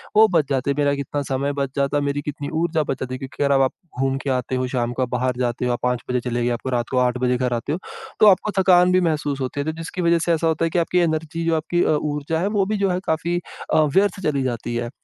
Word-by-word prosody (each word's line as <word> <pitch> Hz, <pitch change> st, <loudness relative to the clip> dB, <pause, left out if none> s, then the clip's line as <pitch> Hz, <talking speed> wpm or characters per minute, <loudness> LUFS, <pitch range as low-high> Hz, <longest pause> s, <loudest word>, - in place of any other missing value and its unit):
वो 220 Hz, +1 st, +7 dB
बच 150 Hz, -4 st, +2 dB
जाते। 135 Hz, 0 st, 0 dB
मेरा 145 Hz, -1 st, +2 dB
कितना 140 Hz, +1 st, -3 dB
समय 140 Hz, +2 st, -1 dB
बच 140 Hz, -, 0 dB
जाता, 140 Hz, +1 st, +1 dB
मेरी 145 Hz, 0 st, -1 dB
कितनी 145 Hz, 0 st, -5 dB
ऊर्जा 160 Hz, -2 st, +1 dB
बच 135 Hz, -, -3 dB
जाती। 130 Hz, 0 st, -4 dB
क्योंकि 135 Hz, +2 st, -4 dB
अगर 140 Hz, 0 st, +3 dB
अब 135 Hz, -, +4 dB
आप 130 Hz, -, +2 dB, 0.3 s
घूम 135 Hz, 0 st, +1 dB
के 140 Hz, -, -2 dB
आते 125 Hz, +1 st, -4 dB
हो, 130 Hz, 0 st, -1 dB
शाम 120 Hz, -2 st, -1 dB
को 130 Hz, -, -3 dB
आप 125 Hz, -, -3 dB
बाहर 125 Hz, 0 st, -1 dB
जाते 125 Hz, 0 st, -1 dB
हो, 125 Hz, -, +1 dB
आप 120 Hz, -, -3 dB
5 125 Hz, -1 st, 0 dB
बजे 125 Hz, -, +1 dB
चले 120 Hz, 0 st, -1 dB
गए, 120 Hz, -, +1 dB
आपको 130 Hz, -, -5 dB
रात 120 Hz, -2 st, -1 dB
को 130 Hz, -, 0 dB
8 125 Hz, 0 st, -2 dB
बजे 125 Hz, 0 st, +2 dB
घर 125 Hz, -1 st, 0 dB
आते 120 Hz, +5 st, -2 dB
हो, 170 Hz, -, -2 dB, 0.4 s
तो 215 Hz, -, +7 dB
आपको 205 Hz, +1 st, +4 dB
थकान 180 Hz, -1 st, +5 dB
भी 185 Hz, 0 st, +4 dB
महसूस 145 Hz, -3 st, -2 dB
होती 130 Hz, +2 st, -3 dB
है, 140 Hz, -, -1 dB
तो 155 Hz, -, 0 dB
जिसकी 180 Hz, +2 st, -5 dB
वज़ह 170 Hz, -1 st, +3 dB
से 170 Hz, -, +3 dB
ऐसा 165 Hz, 0 st, +1 dB
होता 160 Hz, +1 st, +1 dB
है -, -, 0 dB
कि 175 Hz, -, +1 dB
आपकी 175 Hz, +2 st, +1 dB
एनर्जी, 165 Hz, 0 st, -1 dB
जो 165 Hz, -1 st, +2 dB
आपकी 175 Hz, +2 st, 0 dB
अ, 155 Hz, -, +2 dB
ऊर्जा 150 Hz, +2 st, -2 dB
है, 185 Hz, -, 0 dB
वो 205 Hz, -2 st, +1 dB
भी 215 Hz, +1 st, -1 dB
जो 200 Hz, -1 st, +1 dB
है, 180 Hz, -, 0 dB
काफ़ी 170 Hz, +2 st, 0 dB, 0.3 s
अ, 155 Hz, -, +5 dB
व्यर्थ 195 Hz, 0 st, +3 dB
चली 140 Hz, -4 st, 0 dB
जाती 120 Hz, -1 st, -3 dB
है। 120 Hz, 0 st, -2 dB
145 Hz, 285 wpm, -22 LUFS, 130-165 Hz, 0.4 s, वो